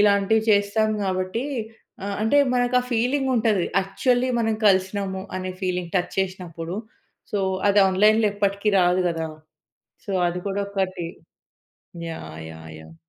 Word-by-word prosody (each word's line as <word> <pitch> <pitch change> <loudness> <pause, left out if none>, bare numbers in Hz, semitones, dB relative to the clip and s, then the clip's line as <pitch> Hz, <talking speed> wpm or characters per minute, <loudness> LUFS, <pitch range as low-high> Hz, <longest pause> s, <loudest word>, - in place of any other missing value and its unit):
ఇలాంటివి 205 +1 +4
చేస్తాం 210 +1 +3
కాబట్టి 185 +5 -1 0.6
ఆహ్, 200 0 -2
అంటే 225 +7 +4 0.2
మనకు 245 0 +3
ఫీలింగ్ 260 +4 +1
ఉంటది. 215 -5 +2 0.2
యాక్చువల్లీ 245 +6 +1
మనం 225 -1 +1
కలిసినాము 190 0 +1
అనే 185 0 -4
ఫీలింగ్, 180 -2 -2
టచ్ 180 - -1
చేసినప్పుడు. 180 -2 -3 0.6
సో, 205 - +1 0.3
అది 205 +1 +4
ఆన్‌లైన్‌లో 210 +3 +4
ఎప్పటికీ 200 0 0
రాదు 180 +1 +3
గదా! 165 -1 -2 0.8
సో, 200 - -3 0.2
అది 180 +1 -3
కూడా 200 +1 -1
ఒకటి. 185 -3 -2 1.0
యాహ్! 120 - -8
యాహ్! 80 0 -11
యాహ్! 80 +1 -14
195 Hz, 130 wpm, -24 LUFS, 185-215 Hz, 1.0 s, ఇలాంటివి